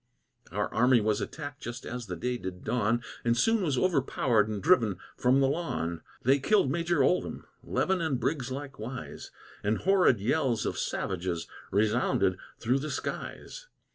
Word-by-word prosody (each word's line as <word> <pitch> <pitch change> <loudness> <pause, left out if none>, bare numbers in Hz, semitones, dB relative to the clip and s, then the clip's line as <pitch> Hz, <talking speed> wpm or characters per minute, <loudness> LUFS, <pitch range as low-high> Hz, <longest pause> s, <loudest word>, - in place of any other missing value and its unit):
Our - - 0
army 125 +2 +5
was 105 -1 +1
attacked 145 -2 -6
just 120 0 -6
as 120 -1 -5
the 90 - -4
day 125 +7 -2
did 90 0 -6
dawn, 120 0 +1 0.2
And 120 0 +2
soon 225 - +3
was 150 -8 0
overpowered 130 - +2
and 105 -2 -3
driven 115 - +3 0.2
from 130 +2 +3
the 135 - +4
lawn. 85 - -2 0.2
They 135 +3 +4
killed 140 -2 +3
Major 170 -2 +1
Ouldham, 180 - 0 0.2
Levin 190 -2 0
and 150 -6 0
Briggs 130 +1 -1
likewise, 130 -3 -6 0.3
And 105 +2 +1
horrid 185 - +4
yells 120 +2 +1
of - - -2
savages 90 -2 -2 0.2
resounded 105 +2 +2 0.2
through 125 +4 +1
the 155 +3 -4
skies. - - -5
125 Hz, 155 wpm, -29 LUFS, 110-150 Hz, 0.3 s, army